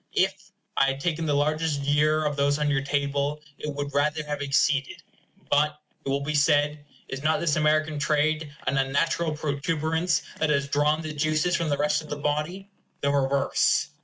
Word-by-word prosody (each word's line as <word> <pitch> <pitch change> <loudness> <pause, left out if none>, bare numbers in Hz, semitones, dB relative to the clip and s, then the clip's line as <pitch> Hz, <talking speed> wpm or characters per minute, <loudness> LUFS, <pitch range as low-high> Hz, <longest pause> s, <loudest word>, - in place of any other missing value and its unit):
If - - 0 0.2
I 135 - +4
had 135 0 -1
taken 165 +1 -1
the 145 - +2
largest 155 0 0
year 150 +2 +2
of 150 -1 0
those 140 0 +2
on 150 -1 +1
your 135 -2 +1
table, 140 +1 -1 0.2
it 150 - -4
would 145 0 -4
rather 150 +2 +1
have 145 -1 -4
exceeded. 140 0 +1 0.5
But, 150 +1 +2 0.2
it - - -4
will 140 +1 0
be 150 +2 -2
said, 145 0 +2 0.2
is 135 0 -5
not 155 +2 +2
this 160 -4 +1
American 155 0 +1
trade 150 +1 +1
an 135 0 +1
unnatural 150 +4 0
protuberance, 160 +3 0 0.2
that 160 - +1
has 140 -2 +1
drawn 150 +2 +1
the 155 -1 -5
juices 155 +3 +1
from 170 -2 -1
the 145 - +1
rest 150 +1 +1
of 155 - -12
the 145 - -3
body? 150 +7 -2 0.3
The 140 - +1
reverse. 140 0 +2
150 Hz, 185 wpm, -26 LUFS, 140-155 Hz, 0.5 s, I